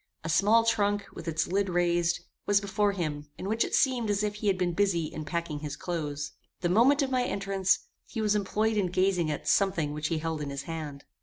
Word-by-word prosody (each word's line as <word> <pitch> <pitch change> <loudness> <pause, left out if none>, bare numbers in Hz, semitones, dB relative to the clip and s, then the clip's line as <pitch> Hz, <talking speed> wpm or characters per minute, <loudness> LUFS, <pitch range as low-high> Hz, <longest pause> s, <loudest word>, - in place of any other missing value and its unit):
A 160 - -4
small 215 +7 +4
trunk, 205 -3 +1
with 165 - -9
its 160 -1 0
lid 195 +2 0
raised, 175 -1 +1 0.3
was 205 -1 +5
before 200 +1 0
him 150 -5 -3
in 190 - -5
which 220 +3 +2
it - - -1
seemed 250 -5 +2
as 205 0 +1
if 210 -1 0
he 210 0 -4
had 195 -2 +3
been 180 -1 0
busy 180 -3 +1
in 155 0 -6
packing 170 -2 -3
his 145 -1 -5
clothes. 150 -4 -4 0.3
The 175 - +1
moment 260 - +5
of 270 - -2
my 255 -1 +2
entrance, 195 -3 +1 0.3
he 230 - -5
was 210 -1 +2
employed 210 +2 0
in 195 -3 +2
gazing 180 -2 +1
at 150 - -4
something 175 -7 +2
which 150 0 -2
he 165 - -1
held 160 -1 -3
in 145 - -3
his 140 0 -5
hand. 150 -3 -6
185 Hz, 225 wpm, -29 LUFS, 160-205 Hz, 0.3 s, was